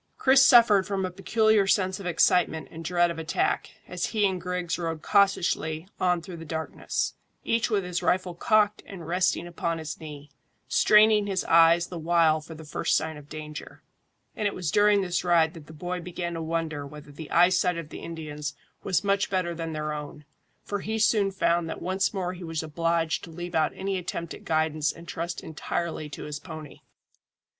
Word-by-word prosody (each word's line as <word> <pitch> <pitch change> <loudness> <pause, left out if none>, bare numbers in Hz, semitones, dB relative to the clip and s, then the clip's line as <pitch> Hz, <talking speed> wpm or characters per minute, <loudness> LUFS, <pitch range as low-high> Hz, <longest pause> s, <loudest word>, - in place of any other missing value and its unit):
Chris 265 0 +5
suffered 225 -7 +6
from 195 -2 -1
a 185 - -4
peculiar 215 +2 +2
sense 190 -1 +1
of 190 - -6
excitement 170 -1 +2
and 165 +1 -8
dread 175 +1 +2
of 165 - -6
attack, 160 0 -1 0.2
as 180 -1 -2
he 215 -2 +1
and 185 -2 -3
Griggs 180 -1 -2
rode 165 -2 -3
cautiously 180 -4 +1
on 180 -2 +1
through 175 -1 -8
the 165 - -8
darkness, 160 0 -3 0.3
each 230 0 +1
with 205 -3 +1
his 180 -1 -3
rifle 180 -1 +1
cocked 210 +3 +2
and 180 -5 -9
resting 180 0 +1
upon 170 -1 -3
his 160 -1 -6
knee, 150 -2 -10 0.4
straining 210 -1 +5
his 190 -2 -1
eyes 165 +1 +5
the 175 -1 -7
while 160 -1 +3
for 160 +1 -10
the 160 - -10
first 150 - +1
sign 160 0 -3
of 150 0 -13
danger. 150 -1 -8 0.5
And 210 - 0
it 200 - -3
was 170 -5 -2
during 205 +1 +4
this 180 -2 -1
ride 170 -2 +3
that 160 -4 -12
the - - -11
boy 180 +3 -4
began 175 0 -5
to 165 - -4
wonder 160 -2 -2
whether 150 +1 -11
the 150 +2 -9
eyesight 180 0 +3
of 165 -3 -6
the - - -8
Indians 150 -3 -6 0.3
was 190 0 0
much 200 0 +1
better 185 -3 -1
than 165 -1 -5
their 150 0 -3
own, 150 0 -8 0.4
for 205 - -3
he 220 +3 -3
soon 215 -2 +3
found 170 -3 0
that - - -5
once 190 +2 0
more 185 -3 -3
he 180 0 -9
was 165 -1 -3
obliged 165 +1 0
to - - -13
leave 175 +2 -7
out 155 -1 +2
any 190 0 -2
attempt 170 -1 -5
at - - -12
guidance 155 -1 +1
and 170 0 -13
trust 170 0 -4
entirely 160 0 -4
to - - -8
his 150 -1 -5
pony. 155 -4 -10
170 Hz, 195 wpm, -26 LUFS, 160-190 Hz, 0.5 s, suffered